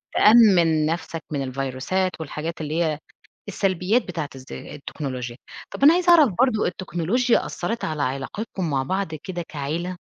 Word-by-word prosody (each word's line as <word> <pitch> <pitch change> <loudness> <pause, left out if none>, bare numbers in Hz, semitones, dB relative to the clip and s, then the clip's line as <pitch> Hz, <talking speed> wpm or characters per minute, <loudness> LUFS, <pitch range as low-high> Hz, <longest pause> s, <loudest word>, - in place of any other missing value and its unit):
تأمِّن 185 -9 +6
نفسك 165 0 -3
من 140 -2 -1
الفيروسات 135 +8 -2
والحاجات 160 +1 -5
اللي 155 +3 -1
هي 155 -2 -1 0.5
السلبيات 195 +3 +1
بتاعت 160 -6 -5
الز 130 -1 -11
التكنولوجيا، 130 -4 -6 0.3
طَب - - -5
أنا 295 +3 +9
عايزة 350 0 +3
أعرف 310 -6 +7
برضه 245 -4 +3
التكنولوجيا 185 +7 0
أثَّرِت 230 +1 -3
على 155 -2 -2
علاقتكم 165 - -3
مع 135 -2 0
بعض 185 +2 -2
كده 175 +3 -6
كعيلة؟ 165 +5 -4
165 Hz, 140 wpm, -23 LUFS, 145-200 Hz, 0.5 s, أنا